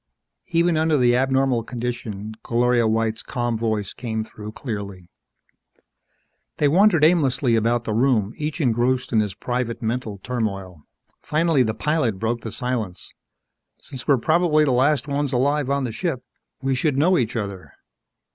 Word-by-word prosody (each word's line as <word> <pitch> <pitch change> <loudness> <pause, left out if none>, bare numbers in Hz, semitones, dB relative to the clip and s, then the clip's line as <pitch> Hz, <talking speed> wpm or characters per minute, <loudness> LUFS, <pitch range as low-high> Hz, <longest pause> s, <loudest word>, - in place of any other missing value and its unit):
Even 170 -2 +2
under 160 -1 +2
the 120 -2 +4
abnormal 130 -1 +2
conditions 115 -3 -5
Gloria 120 -1 +2
White's 110 0 0
calm 120 -2 -2
voice 110 -3 -2
came 110 -3 -3
through 105 -1 -9
clearly. 100 -8 -6 1.5
They 150 - +3
wandered 175 +1 +4
aimlessly 140 -7 +3
about 115 +1 +1
the 110 - -3
room, 115 -3 +2
each 150 +2 -4
engrossed 125 -1 +1
in 110 - +4
his 105 -3 -1
private 125 -2 -3
mental 110 -2 -2
turmoil. 100 -6 -4 0.4
Finally 155 -2 +2
the 110 -3 0
pilot 150 -9 0
broke 115 +3 -2
the 110 - -6
silence, 115 -8 -4 0.7
"Since 130 -3 -10
we're 140 -3 +5
probably 155 +3 +3
the 140 - +1
last 140 +4 +2
ones 140 -1 -1
alive 140 +2 +1
on 140 0 +1
the 120 - -2
ship, 135 - -3 0.4
we 135 0 +1
should 135 +1 0
know 175 +6 +4
each 125 -7 0
other. 100 -4 -5
125 Hz, 150 wpm, -22 LUFS, 110-140 Hz, 1.5 s, we're